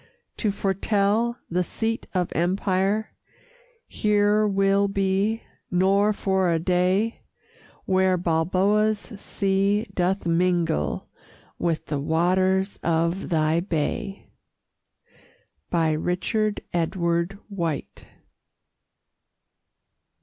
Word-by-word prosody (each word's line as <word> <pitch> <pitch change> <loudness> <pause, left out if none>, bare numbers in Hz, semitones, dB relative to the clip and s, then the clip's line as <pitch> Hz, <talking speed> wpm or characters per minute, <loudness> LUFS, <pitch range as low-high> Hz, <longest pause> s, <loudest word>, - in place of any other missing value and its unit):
To 215 - 0
foretell 205 +4 0
the 180 +1 0
seat 225 +5 -3
of 180 -2 0
empire 190 +4 0 0.7
Here 210 0 +2
will 195 0 +2
be, 195 +3 0 0.3
nor 195 +3 +3
for 190 -3 +1
a 165 - +2
day, 185 +6 +1 0.6
Where 185 -1 +2
Balboa's 185 +6 +2
sea 200 -1 -1
doth 185 +1 0
mingle 170 - +1 0.5
With 165 -2 -1
the 145 - -2
waters 185 +5 +1
of 170 +3 0
thy 160 -1 +2
bay! 175 +2 -3 1.5
RICHARD 180 +6 0
EDWARD 170 +2 0
WHITE. 170 -8 -4
190 Hz, 80 wpm, -24 LUFS, 170-200 Hz, 1.5 s, nor